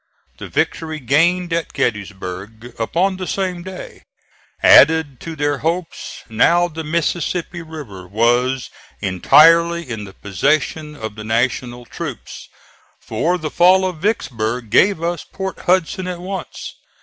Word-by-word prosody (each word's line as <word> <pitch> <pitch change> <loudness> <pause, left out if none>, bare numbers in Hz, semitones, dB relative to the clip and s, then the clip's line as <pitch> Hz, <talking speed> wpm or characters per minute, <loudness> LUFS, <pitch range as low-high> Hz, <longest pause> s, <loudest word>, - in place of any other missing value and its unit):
The - - -7
victory 160 -1 -1
gained 165 +7 +2
at 165 -1 -2
Gettysburg, 105 +2 -4
upon 185 +11 0
the 185 -1 -5
same 185 -3 -2
day, 185 +1 -9 0.6
added 150 -4 +6
to 165 -1 -7
their 145 -2 -1
hopes. 165 +2 -4
Now 170 +10 +3
the 160 -1 -7
Mississippi 170 +2 -2
River 140 - -9
was 120 +5 +1 0.3
entirely 165 - +4
in 110 -4 -5
the 95 - -12
possession 150 - -1
of 110 -6 -6
the 110 0 -9
National 120 +2 -1
troops; - - -7 0.5
for 175 +2 -1
the 155 -3 -5
fall 185 +2 +5
of 180 -3 -3
Vicksburg 120 - -2
gave 190 - +4
us 170 -1 -2
Port 190 0 -6
Hudson 185 +1 +1
at 180 -1 -4
once. 185 0 -6
155 Hz, 130 wpm, -19 LUFS, 120-175 Hz, 0.6 s, added